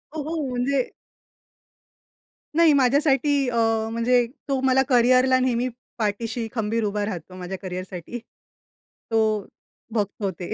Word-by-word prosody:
हो, 305 - -2
हो. 320 +1 -3
म्हणजे 255 +2 0 1.7
नाही 330 -3 +6
माझ्यासाठी 280 +1 +3 0.2
अ, 235 - -3 0.4
म्हणजे 240 +1 +2 0.2
तो 270 -1 +1
मला 265 0 +4
करियरला 255 +1 +5
नेहमी 250 -1 +1 0.3
पाठीशी 225 +2 -2
खंबीर 225 0 0
उभा 205 0 -1
राहतो, 185 -2 -6
माझ्या 185 +1 -6
करियरसाठी. 185 +4 -6 0.7
तो 220 -2 -1 0.5
बघतो 200 -2 -1
ते. 175 - -4
235 Hz, 115 wpm, -24 LUFS, 205-260 Hz, 1.7 s, नाही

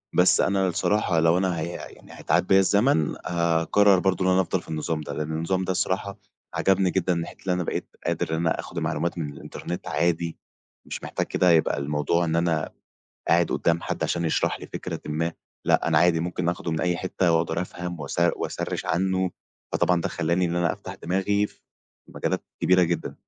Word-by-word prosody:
بس 90 - +5
أنا 95 -1 +2
الصراحة 90 -1 +1
لو 80 +2 +4
أنا 90 -2 0
هي 80 - -2
يعني 85 - -10
هيتعاد - - +1
بيّا 95 - +6
الزمن 100 - +3
هاقرر 85 +3 +3
برضو 95 0 +1
إن 95 - +3
أنا 95 +1 +4
أفضل 90 0 -1
في - - -17
النظام 80 0 -2
ده، 75 -1 -6
لأن 75 +2 -3
النظام 85 +4 -1
ده 95 - -1
الصراحة 95 +1 -1 0.4
عجبني 95 -1 +2
جدًا 95 -1 +1
من 85 - -1
ناحية - - -7
اللي 95 - 0
أنا 90 0 -1
بقيت - - -3 0.2
قادر - - -1
إن - - +1
أنا 80 0 0
أخد - - -5
معلومات 85 +4 -1
من 75 -4 -3
الإنترنت 85 +4 -7
عادي، 85 -1 0 0.5
مش - - -6
محتاج - - -2
كده 90 -1 +3
يبقى 80 -1 +3
الموضوع 75 +4 0
إن 80 0 0
أنا 85 -2 +1 0.6
قاعد 85 0 +4
قدّام 85 0 +1
حد - - -3
عشان 85 0 -1
يشرح 80 - 0
لي - - -8
فكرةٍ - - -5
ما، 80 +2 -1 0.3
لأ - - +3
أنا - - +4
عادي 85 -2 +4
ممكن 90 0 -2
اخده 85 0 -2
من 80 - -1
أي 90 -1 +1
حتّة 90 -1 0
وأقدر 80 0 +1
أفهم 90 -2 -5
واس 70 +3 -3 0.2
واسرّش - - -3
عنّه، 95 +1 +1 0.4
فطبعًا 90 -1 +2
ده - - -1
خلّاني 85 +2 0
إن 85 0 -1
أنا 85 -1 +2
أفتح - - -8
دماغي 95 +3 0
في - - -23 0.5
مجالات - - -2 0.2
كبيرة 90 0 +5
جدًا. 85 -1 -1
85 Hz, 195 wpm, -25 LUFS, 80-95 Hz, 0.6 s, بيّا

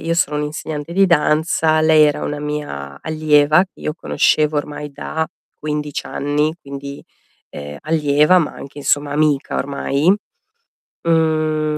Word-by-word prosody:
io 165 0 0
sono 150 -3 +1
un 150 - -1
insegnante 150 +1 -5
di 195 0 +5
danza, 155 -1 +2
lei 155 -1 +6
era 150 -1 0
una 145 0 -3
mia 110 - -5
allieva 155 +2 +3
che 190 - -22
io 155 - -2
conoscevo 155 -2 +1
ormai 145 0 -6
da 160 +3 -3 0.3
15 150 -1 -3
anni, 150 +2 -1
quindi, 140 0 -8 0.5
ehm, 75 0 -8
allieva, 150 +2 +3
ma 165 - -1
anche 140 +1 -10
insomma 145 0 0
amica 150 -2 +1
ormai. 140 +5 +1 0.9
Mhmm, 155 -2 +1
150 Hz, 140 wpm, -19 LUFS, 145-155 Hz, 0.9 s, lei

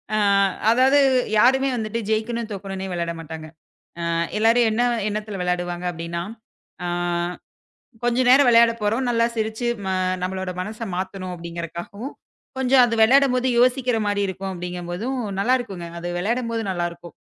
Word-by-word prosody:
அ - - +2 0.5
அதாது 260 +4 +5 0.4
யாருமே 265 +3 +4
வந்துட்டு 220 0 -3
ஜெயிக்கணும், 225 +1 -1
தோக்கணுனே 195 -1 -5
வெளாட 170 -1 -2
மாட்டாங்க. 160 0 -8 0.5
ஆ, - - -3 0.4
எல்லாரும் 230 +1 +4
என்ன 230 +3 +1 0.3
எண்ணத்துல 210 -1 -4
வேளாடுவாங்க 175 0 -2
அப்படின்னா, 170 +1 -4 0.6
ஆ - - -1 1.2
கொஞ்ச 240 +1 +1
நேர 270 - +7
வெளையாடப்போறோம் 230 +1 +3
நல்லா 230 -1 +3
சிரிச்சு 220 +2 -2 0.6
நம்மளோட 190 0 -3
மனச 215 +4 -6
மாத்தணும். 185 -1 -4
அப்படிங்கறக்காகவும், 170 - -7 0.4
கொஞ்சம் 260 0 +5
அது 230 - -2
விளையாடும்போது 255 +1 +4
யோசிக்கிற 250 -1 +3
மாரியு 205 -1 0
இருக்கும் 190 +1 -5
அப்படிங்கிறபோதும் 180 +7 -4 0.2
நல்லா 250 +6 +3
இருக்குங்க. 190 -8 -6
அது 175 - -5
விளையாடும்போது 230 +4 -1
நல்லா 175 -2 -1
இருக்கும். 170 -1 -13
215 Hz, 130 wpm, -23 LUFS, 180-240 Hz, 1.2 s, நேர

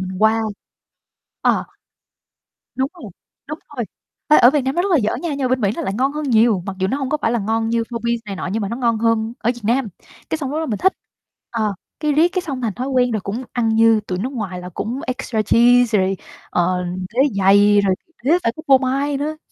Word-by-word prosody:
mình 185 0 -5
qua 225 +1 +4 1.0
ờ. - - +2 1.1
Đúng 265 +1 0
rồi, 240 - -10 0.4
đúng 300 +2 -6 0.2
rồi, 240 - -1 0.4
ê, 305 - +7
ở 245 - +8
Việt 295 - +2
Nam 265 +1 -2
nó 350 - +2
rất 395 - -1
là 340 - +5
dở 215 -5 0
nha 340 - -4
nhưng 285 -1 -3
ở - - -6
bên 255 0 +1
Mỹ 200 - +2
nó - - -3
lại 195 - -2
ngon 265 +5 +1
hơn 305 0 -3
nhiều, 220 -5 +3
mặc 195 - -5
dù 190 - +1
nó 265 - -1
hông 270 -2 -3
có 305 - 0
phải 225 - +1
là 240 - +1
ngon 225 +2 -1
như 230 0 +1
4P's 235 0 -1
này 200 -2 -5
nọ - - -4
nhưng 225 - -1
mà 200 - -2
nó 230 - -3
ngon 235 -3 +1
hơn 225 0 +1
ở 240 - +1
Việt 240 - -12
Nam. 235 +2 +1 0.4
Cái 320 - -1
xong 280 -3 -4
lúc 310 - -1
đó 320 - -2
mình 215 -6 -2
thích, 380 - +3 0.6
ờ, 215 -3 -1 0.3
cái 300 -1 +1
riết 315 +4 +5
cái 370 - 0
xong 275 -7 -5
thành 225 -5 -1
thói 255 +2 -4
quen 250 -2 +2
rồi 215 -2 -1
cũng 215 +7 -4
ăn 235 -2 +1
như 225 0 +4
tụi 180 - -2
nước 255 +7 -3
ngoài 195 -7 -4
là 180 - -7
cũng 230 +8 -4
extra 250 -3 -2
cheese 235 +1 +4
rồi, 190 0 0 0.3
ờ, 180 +1 0 0.3
đế 245 - -2 0.2
dày 205 +1 +5
rồi 190 -2 +2 0.3
đế 285 - +2
phải 230 - +2
có - - -6
phô 270 -1 +7
mai 275 +2 -1
nữa. 305 +2 -3
235 Hz, 250 wpm, -20 LUFS, 210-270 Hz, 1.1 s, ở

